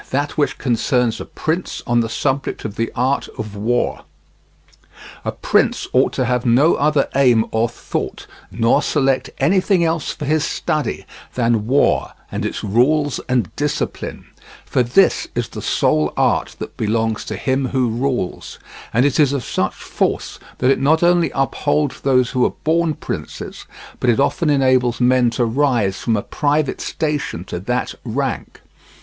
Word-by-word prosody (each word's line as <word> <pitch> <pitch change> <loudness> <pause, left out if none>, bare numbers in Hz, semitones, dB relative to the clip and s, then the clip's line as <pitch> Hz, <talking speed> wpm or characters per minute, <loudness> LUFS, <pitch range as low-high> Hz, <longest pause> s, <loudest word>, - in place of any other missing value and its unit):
THAT 145 +2 -1
WHICH 145 -2 0
CONCERNS 125 -1 0
A - - -6
PRINCE 165 +3 -3
ON 120 0 +2
THE 115 -1 0
SUBJECT 135 +2 -2
OF 105 -1 -4
THE 115 0 -2
ART 130 +3 0
OF 105 -2 -6
WAR 120 +4 -1 1.2
A - - -2
prince - - +1
ought - - +4
to 130 - 0
have 125 0 0
no 130 +7 +4
other 145 -1 +2
aim 125 -5 +4
or 110 +1 +1
thought, - - -5 0.2
nor 115 +5 +2
select 135 -3 +1
anything 185 0 +2
else 165 -2 0
for 150 - -6
his 155 +1 +1
study, 150 -6 -2 0.3
than 115 -3 +1
war 140 +3 +2 0.2
and - - -2
its - - -5
rules 130 +7 +2
and 120 -9 0
discipline; - - -3 0.4
for - - +1
this 125 +11 +3
is - - -2
the - - -7
sole 75 -1 +1
art - - +1
that - - -8
belongs 110 0 0
to - - -4
him 130 0 0
who 130 0 +1
rules, 120 -4 -2 0.3
and 125 +4 +3
it 145 +2 +1
is 145 -2 +4
of 135 -4 -2
such - - -1
force - - -2 0.2
that 130 +1 +3
it - - +1
not 160 +4 +3
only 175 -1 +4
upholds 145 +1 0
those 125 -3 +2
who 125 -1 +1
are - - +1
born 160 0 +2
princes, - - -6 0.3
but 125 - +1
it 120 - +3
often 155 +3 +1
enables 130 -4 +2
men 125 -1 +4
to 120 +1 0
rise 115 -6 +1
from 115 -2 0
a 100 - -2
private 145 -1 0
station 150 - -2
to 90 - -5
that 125 +7 -2
rank. 130 +3 -3
130 Hz, 165 wpm, -19 LUFS, 115-145 Hz, 1.2 s, ought